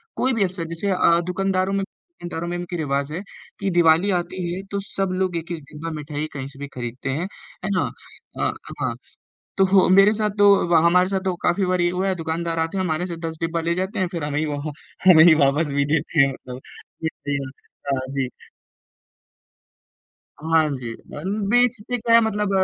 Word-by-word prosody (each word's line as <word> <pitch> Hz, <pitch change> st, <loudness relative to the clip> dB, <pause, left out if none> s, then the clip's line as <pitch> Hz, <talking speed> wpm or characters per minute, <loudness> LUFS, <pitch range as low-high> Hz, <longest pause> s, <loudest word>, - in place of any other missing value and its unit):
कोई 260 Hz, 0 st, +1 dB
भी 225 Hz, -, +2 dB
अवसर 180 Hz, -3 st, -3 dB
जैसे 200 Hz, +4 st, -2 dB
अ, 170 Hz, -2 st, +4 dB
दुकानदारों 190 Hz, +1 st, 0 dB
में 195 Hz, 0 st, 0 dB
दुकानदारों 175 Hz, -, -8 dB
में 175 Hz, 0 st, -2 dB
इनकी 175 Hz, 0 st, -5 dB
रिवाज़ 140 Hz, -1 st, -1 dB
है, 180 Hz, -, -3 dB, 0.4 s
कि 200 Hz, -1 st, -1 dB
दिवाली 170 Hz, +3 st, +4 dB
आती 175 Hz, 0 st, -4 dB
है 185 Hz, -, -4 dB
तो 200 Hz, -, -1 dB
सब 195 Hz, -1 st, -1 dB
लोग 185 Hz, -2 st, 0 dB
1-1 165 Hz, -1 st, -5 dB
डिब्बा 160 Hz, +2 st, -6 dB
मिठाई 150 Hz, 0 st, -4 dB
कहीं 135 Hz, -2 st, -5 dB
से 140 Hz, 0 st, -14 dB
भी 145 Hz, -, -5 dB
खरीदते 125 Hz, +2 st, -5 dB
हैं, 155 Hz, +7 st, -1 dB, 0.4 s
है 195 Hz, -, -1 dB
ना? 185 Hz, -, +1 dB, 0.5 s
अ, -, -, +1 dB, 0.3 s
हाँ, -, -, -1 dB, 0.6 s
तो 190 Hz, 0 st, +5 dB
मेरे 195 Hz, +2 st, +7 dB
साथ 215 Hz, -1 st, 0 dB
तो 205 Hz, -, +5 dB, 0.2 s
वा 170 Hz, -, +5 dB
हमारे 180 Hz, +2 st, +5 dB
साथ 195 Hz, -1 st, 0 dB
तो 185 Hz, -2 st, 0 dB
काफ़ी 190 Hz, +2 st, +2 dB
बार 180 Hz, -1 st, +1 dB
ये 175 Hz, -, +3 dB
हुआ 185 Hz, +2 st, -1 dB
है, 190 Hz, -, +1 dB
दुकानदार 165 Hz, 0 st, -2 dB
आते 165 Hz, +4 st, -1 dB
हैं 185 Hz, -, +1 dB
हमारे 165 Hz, 0 st, -1 dB
से 170 Hz, -, -5 dB
10 160 Hz, 0 st, -6 dB
डिब्बा 165 Hz, 0 st, -1 dB
ले 170 Hz, +1 st, 0 dB
जाते 190 Hz, +3 st, -2 dB
हैं 185 Hz, -, +1 dB
फिर 170 Hz, -4 st, -4 dB
हमें 145 Hz, 0 st, -1 dB
ही 155 Hz, -, 0 dB
वो, 145 Hz, -1 st, -3 dB, 0.5 s
हमें 160 Hz, -3 st, +9 dB
ही 170 Hz, -, +8 dB
वापस 145 Hz, +2 st, +1 dB
भी 140 Hz, 0 st, +2 dB
देते 160 Hz, 0 st, 0 dB
हैं 135 Hz, 0 st, +4 dB
मतलब 125 Hz, -1 st, -9 dB, 0.4 s
कितनी 145 Hz, -3 st, -3 dB
बार 130 Hz, +1 st, -14 dB, 0.3 s
हाँ 130 Hz, -, -5 dB
जी। 135 Hz, -2 st, 0 dB, 2.1 s
हाँ 160 Hz, -1 st, +3 dB
जी 120 Hz, -2 st, -6 dB
अ, 145 Hz, -, -10 dB, 0.3 s
बेचते 245 Hz, -1 st, +2 dB
क्या 230 Hz, 0 st, +1 dB
है 230 Hz, -, +7 dB
मतलब 210 Hz, -2 st, 0 dB
170 Hz, 200 wpm, -22 LUFS, 155-190 Hz, 2.1 s, हमें